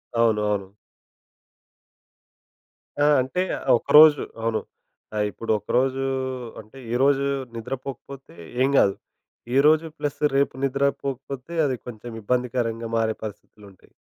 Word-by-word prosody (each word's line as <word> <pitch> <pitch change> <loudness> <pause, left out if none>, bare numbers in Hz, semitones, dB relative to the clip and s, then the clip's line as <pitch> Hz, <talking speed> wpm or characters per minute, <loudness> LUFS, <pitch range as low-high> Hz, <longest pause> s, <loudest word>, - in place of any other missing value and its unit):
అవును 115 -2 +3
అవును. 100 -1 -4 2.3
ఆ! - - +5
అంటే 135 +8 -2 0.3
ఆ - - 0
ఒకరోజు 150 +2 +7 0.2
అవును. 115 -1 0 0.6
ఆహ్, 105 0 +1
ఇప్పుడు 115 - -4
ఒకరోజు 130 +5 0 0.6
అంటే 110 +5 -18 0.2
ఈరోజు 140 +2 +3 0.3
నిద్రపోకపోతే 135 -1 -7 0.3
ఏం 135 - +4
కాదు. 100 -5 +4 0.6
ఈరోజు 155 +3 +5
ప్లస్ 145 -1 -3 0.2
రేపు 140 - +2
నిద్రపోకపోతే 140 +1 -2
అది 135 -3 0
కొంచెం 120 0 -8
ఇబ్బందికరంగా 120 -1 -1
మారే 110 -1 0
పరిస్థితులుంటాయి. 105 -2 -11
125 Hz, 100 wpm, -24 LUFS, 110-140 Hz, 2.3 s, ఒకరోజు